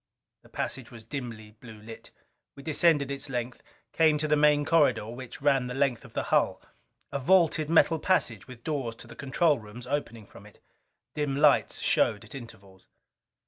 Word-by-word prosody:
The - - -21
passage 130 -2 -4
was 115 -2 -12
dimly 115 -3 -7
blue 110 0 -13
lit. 110 +1 -11 0.5
We 140 - -12
descended 150 -2 +2
its 140 0 -5
length, 125 -1 -4 0.3
came 155 -2 +4
to 155 +1 -1
the 150 - +3
main 150 0 +4
corridor, 145 -10 +3
which 125 +2 -9
ran 135 -3 +3
the 125 - -5
length 135 -4 0
of - - -15
the - - -2
hull. - - +2 0.5
A 140 - -2
vaulted 155 0 +3
metal 165 0 +4
passage, 125 - 0
with 125 -2 -12
doors 135 -7 -3
to - - -13
the 120 0 -12
control 140 +3 +1
rooms 110 +3 -11
opening 115 -5 -4
from 100 +1 -15
it. 105 - -19 0.5
Dim 145 -2 -2
lights 145 -1 +3
showed - - +1
at - - -12
intervals. 100 -7 -12
135 Hz, 180 wpm, -28 LUFS, 115-150 Hz, 0.5 s, came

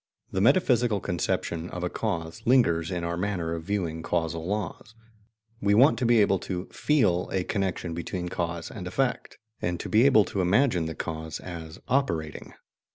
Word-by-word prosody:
The 95 - 0
metaphysical 120 - +3
conception 85 -1 -2
of 90 - -5
a - - +1
cause 80 -1 -3
lingers 105 -10 +3
in 90 -2 -3
our 85 0 -2
manner 90 -3 -2
of 80 -1 -5
viewing 90 -6 -2
causal 80 0 -2
laws: 105 +3 -4 0.7
we 100 0 +3
want 130 +8 +5
to 125 - +1
be 120 -1 +5
able 100 -2 +3
to 90 0 -4
FEEL 105 -13 +2
a 95 - 0
connection 95 -4 -2
between 90 +1 -4
cause 85 -1 -3
and 95 -5 -7
effect, 130 +7 -1 0.2
and 85 -1 -1
to - - -5
be 115 +5 +5
able 110 -7 +5
to 95 - -2
imagine 90 -2 +2
the 80 - -5
cause 80 -1 -5
as 85 -2 -8
"operating." 85 - -1
90 Hz, 170 wpm, -27 LUFS, 85-105 Hz, 0.7 s, want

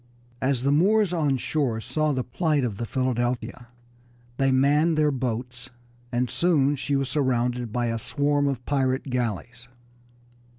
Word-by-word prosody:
As 130 -1 0
the 140 - +2
Moors 195 +5 +3
on 150 -6 +1
shore 125 -2 -1
saw 155 +6 -1
the 130 -3 -1
plight 150 +1 0
of 110 -5 -2
the 115 - -4
Philadelphia 120 -1 -2 0.7
they 135 0 +2
manned 145 +5 +3
their 150 -1 +3
boats, 125 -1 -4 0.4
and 125 0 0
soon 145 -2 +2
she 140 +1 -2
was 135 -1 0
surrounded 125 -4 0
by 120 +1 -1
a 115 -1 -1
swarm 145 +4 0
of 130 -3 -3
pirate 135 -1 0
galleys. 120 0 -3
130 Hz, 145 wpm, -25 LUFS, 120-145 Hz, 0.7 s, Moors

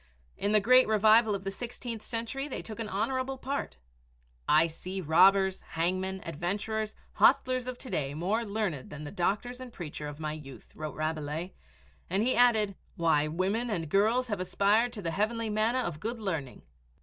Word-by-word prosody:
In 200 - -1
the 215 - +5
great 255 +5 +6
revival 215 0 +5
of 195 - -6
the 195 - -3
sixteenth 235 +1 -6
century 235 +5 -3
they 275 - -5
took 220 0 -8
an 225 -2 -3
honorable 260 +6 -1
part. 275 - -4 0.7
"I 155 +2 +6
see 180 +4 -5
the 185 - -6
robbers, 190 +4 +5
hangmen, 185 +3 -1
adventurers, 205 +7 -3 0.2
hostlers 255 -1 +4
of 255 -1 -4
to 255 - -9
day 140 -1 -1
more 195 +9 0
learned 200 - -3
than 150 0 -8
the 145 - -6
doctors 215 +8 -1
and 255 -1 -8
preacher 150 -7 -6
of 145 0 -8
my 155 -1 -3
youth," 140 -4 -11
wrote 155 -1 -5
Rabelais, 155 +2 -3 0.6
and 195 +4 +1
he 255 - +2
added, 220 -5 +4 0.2
"why, 160 -3 +2
women 195 +9 -1
and 165 -7 -2
girls 220 +8 +3
have 205 -3 -2
aspired 200 +6 +2
to 205 - -7
the 165 - -1
heavenly 220 +4 -1
manna 220 +4 +1
of 170 -9 -4
good 230 +6 -4
learning." 165 - -4
200 Hz, 180 wpm, -30 LUFS, 165-230 Hz, 0.7 s, great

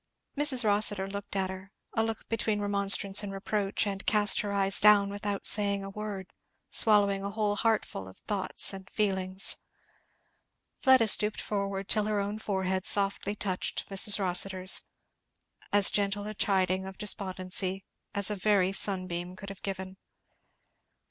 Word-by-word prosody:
Mrs. 280 -5 +4
Rossitur 205 -2 +2
looked 200 0 -7
at 190 -1 -2
her, 190 +1 -11 0.2
a 225 - 0
look 225 -1 -5
between 220 -2 -2
remonstrance 200 -1 +3
and 205 -1 -6
reproach, 195 +1 -2
and 195 -1 -5
cast 210 -2 +3
her 205 - -5
eyes 195 -1 +2
down 205 -1 +5
without 205 -1 -5
saying 200 -1 +3
a 195 - -8
word, 205 -2 -8 0.4
swallowing 205 -3 +3
a 200 - -4
whole 210 0 -2
heartful 215 - -2
of 95 - -14
thoughts 195 -1 -1
and 190 0 -10
feelings. 190 -2 -1 1.2
Fleda 260 -4 +4
stooped 210 0 +3
forward 200 -1 -4
till 210 0 +1
her 210 -1 -1
own 205 +2 -4
forehead 190 -3 -3
softly 200 0 +3
touched 190 -3 -4
Mrs. 200 +1 +4
Rossitur's, 185 0 +2 0.9
as 205 -1 +4
gentle 205 0 -2
a 215 - -6
chiding 190 -2 -1
of 190 - -11
despondency 190 -2 -2 0.3
as 200 +1 +2
a - - -2
very 195 -2 +1
sunbeam 185 -2 -2
could 200 +1 -10
have 195 -1 -11
given. 190 -1 -6
200 Hz, 150 wpm, -28 LUFS, 190-210 Hz, 1.2 s, down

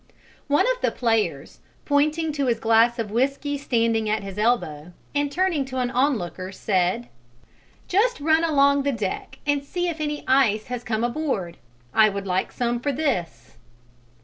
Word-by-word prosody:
One 290 0 +3
of - - -12
the - - +2
players, 225 -3 -1 0.3
pointing 305 +2 +1
to 285 -3 -1
his 235 -2 +1
glass 230 +2 +4
of 220 -3 -3
whiskey 275 +5 0
standing 230 -5 0
at 215 -1 0
his 195 +1 -7
elbow, 175 -8 0 0.2
and 285 0 0
turning 355 -3 +1
to 260 0 -6
an 250 -1 0
onlooker, 215 -9 -1
said, 185 - 0 0.8
"Just 435 +4 +2
run 315 +2 +3
along 280 -3 +4
the 280 +1 0
deck 210 -7 -4
and 290 -1 +1
see 355 +4 -2
if 320 -2 -5
any 295 -1 -3
ice 250 -5 +3
has 245 -1 -4
come 220 -1 -2
aboard: 240 - -2 0.4
I 215 -1 +6
would 200 -1 -5
like 185 0 -1
some 240 -1 -1
for 285 +4 -1
this." 175 - -3
245 Hz, 165 wpm, -24 LUFS, 215-290 Hz, 0.8 s, I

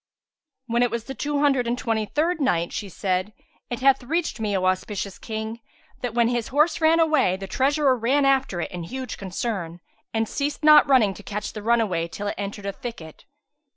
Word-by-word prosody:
When 235 0 0
it 245 - +3
was 235 -1 -3
the 270 - -7
Two 290 +1 -2
Hundred 270 -4 +2
and 240 +1 0
Twenty 220 -3 -1
third 320 - 0
Night, 175 -10 +1
She 205 - -4
said, 185 +2 -2 0.4
It 240 -1 -4
hath 270 0 +4
reached 315 +2 -2
me, 210 -3 0
O 185 - -1
auspicious 190 +1 -2
King, 220 0 -5 0.4
that 240 -2 -3
when 235 -1 +4
his 240 -1 -1
horse 310 +4 +2
ran 320 +1 +5
away, 310 - +3
the 195 - -6
treasurer 270 +5 +2
ran 260 +5 +2
after 270 -9 +2
it - - -4
in 180 - -5
huge 260 +6 -6
concern, 185 -3 -4 0.3
and 225 0 0
ceased 290 +5 -3
not 300 -1 +7
running 230 -8 +4
to 205 - -11
catch 210 0 -5
the 215 - -6
runaway 210 -7 +1
till 205 +4 -7
it - - -4
entered 200 0 -5
a 200 - -1
thicket. 190 -10 -9
235 Hz, 200 wpm, -24 LUFS, 200-275 Hz, 0.4 s, not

